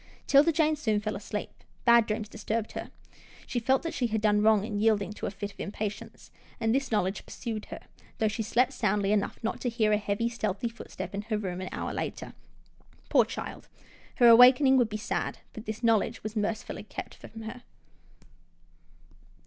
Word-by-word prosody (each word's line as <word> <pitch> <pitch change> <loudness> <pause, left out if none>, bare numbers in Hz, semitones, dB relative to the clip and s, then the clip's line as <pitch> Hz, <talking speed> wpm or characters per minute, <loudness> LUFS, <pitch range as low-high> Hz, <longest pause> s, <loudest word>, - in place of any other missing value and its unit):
'Tilda 290 +4 +5
Jane 315 -1 +2
soon 220 -8 0
fell 215 +1 -3
asleep. 210 +1 -5 0.3
Bad 235 -2 +6
dreams 215 0 -2
dis 215 0 -11
turbed 220 0 -1
her. - - -6 0.6
She 245 - -2
felt 260 +3 +2
that 330 - -3
she 245 - 0
had 220 -1 -1
done 210 -1 +3
wrong 215 -1 +4
in 210 -2 -3
yielding 210 -2 +2
to - - -5
a - - -1
fit 200 +1 -6
of - - -29
impatience, 205 +1 -6 0.3
and 225 -1 +1
this 275 0 0
knowledge 195 -2 0
pursued 220 -4 -5
her, - - -8 0.4
though 220 - +2
she 215 +2 -2
slept 245 +5 +2
soundly 205 -4 +1
enough 210 -1 0
not 225 - -2
to 245 - 0
hear 220 -2 +1
a 210 - +4
heavy, 205 +2 -1
stealthy 230 -1 -2
footstep 230 - -8
in 200 - -2
her 215 0 -2
room 185 -3 -4
an 185 - -5
hour - - -4
later. - - -5 0.8
Poor - - +5
child - - -7 0.3
— - - -26
her 240 - +6
awakening 250 +3 +8
would 245 -4 +3
be 215 - -3
sad, 215 - -3 0.2
but 220 0 -9
this 220 +2 -5
knowledge 225 0 +2
was 215 +1 -5
mercifully 215 +1 -2
kept - - -8
from 225 - -11
her. 230 +3 -7
220 Hz, 195 wpm, -28 LUFS, 210-235 Hz, 0.8 s, awakening